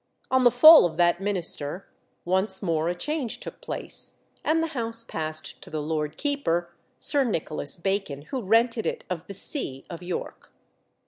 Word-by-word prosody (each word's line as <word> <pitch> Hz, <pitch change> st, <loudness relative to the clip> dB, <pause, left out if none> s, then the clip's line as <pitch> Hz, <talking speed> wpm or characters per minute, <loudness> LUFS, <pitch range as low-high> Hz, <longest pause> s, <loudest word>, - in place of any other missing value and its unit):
On 260 Hz, 0 st, +4 dB
the 245 Hz, -, +8 dB
fall 305 Hz, -, +9 dB
of 160 Hz, -2 st, -10 dB
that 175 Hz, +1 st, +3 dB
minister, 185 Hz, -4 st, -2 dB, 0.4 s
once 190 Hz, +2 st, +1 dB
more 165 Hz, -3 st, 0 dB
a 175 Hz, -, -1 dB
change 285 Hz, -, -3 dB
took -, -, -9 dB
place, -, -, -6 dB, 0.3 s
and 325 Hz, +1 st, +2 dB
the 325 Hz, -, -2 dB
house 230 Hz, -2 st, 0 dB
passed 155 Hz, -6 st, -3 dB
to -, -, -9 dB
the 155 Hz, -, -3 dB
Lord 150 Hz, 0 st, -3 dB
Keeper, 175 Hz, -, -1 dB, 0.2 s
Sir 285 Hz, -2 st, +1 dB
Nicholas 160 Hz, -, -3 dB
Bacon, 175 Hz, -6 st, -2 dB
who 260 Hz, -, -4 dB
rented 230 Hz, +2 st, +2 dB
it -, -, -3 dB
of 175 Hz, -1 st, -4 dB
the 200 Hz, -, -7 dB
see 160 Hz, -, -2 dB
of 170 Hz, -, -7 dB
York. 180 Hz, 0 st, -6 dB
190 Hz, 170 wpm, -26 LUFS, 160-240 Hz, 0.4 s, fall